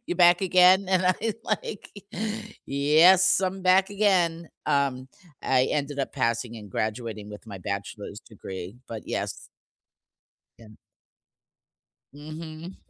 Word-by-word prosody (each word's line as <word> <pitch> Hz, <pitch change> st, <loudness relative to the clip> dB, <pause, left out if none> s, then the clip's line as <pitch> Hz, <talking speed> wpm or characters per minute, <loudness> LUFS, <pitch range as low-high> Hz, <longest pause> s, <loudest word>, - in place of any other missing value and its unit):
you 175 Hz, -, -2 dB
back 175 Hz, 0 st, +6 dB
again?" 185 Hz, +1 st, +5 dB
And 185 Hz, -1 st, +2 dB
I'm 210 Hz, +5 st, +1 dB
like, 205 Hz, -, -4 dB, 0.8 s
"Yes, 160 Hz, +8 st, +5 dB
I'm 190 Hz, 0 st, -2 dB
back 190 Hz, +2 st, +4 dB
again." 180 Hz, -5 st, +1 dB, 0.2 s
Um, 140 Hz, -3 st, 0 dB, 0.3 s
I 130 Hz, -1 st, +3 dB
ended 145 Hz, 0 st, -2 dB
up 135 Hz, -, -2 dB
passing 115 Hz, -2 st, -1 dB
and 105 Hz, -3 st, -11 dB
graduating 110 Hz, -1 st, -4 dB
with 105 Hz, +2 st, -11 dB
my 100 Hz, -3 st, -8 dB
bachelor's 100 Hz, +2 st, -6 dB
degree, 95 Hz, -1 st, -9 dB
but 110 Hz, -3 st, -6 dB
yes. -, -, -4 dB, 1.1 s
And 110 Hz, -2 st, -15 dB, 1.4 s
Mhm. 155 Hz, +4 st, -9 dB
145 Hz, 115 wpm, -26 LUFS, 115-185 Hz, 1.4 s, back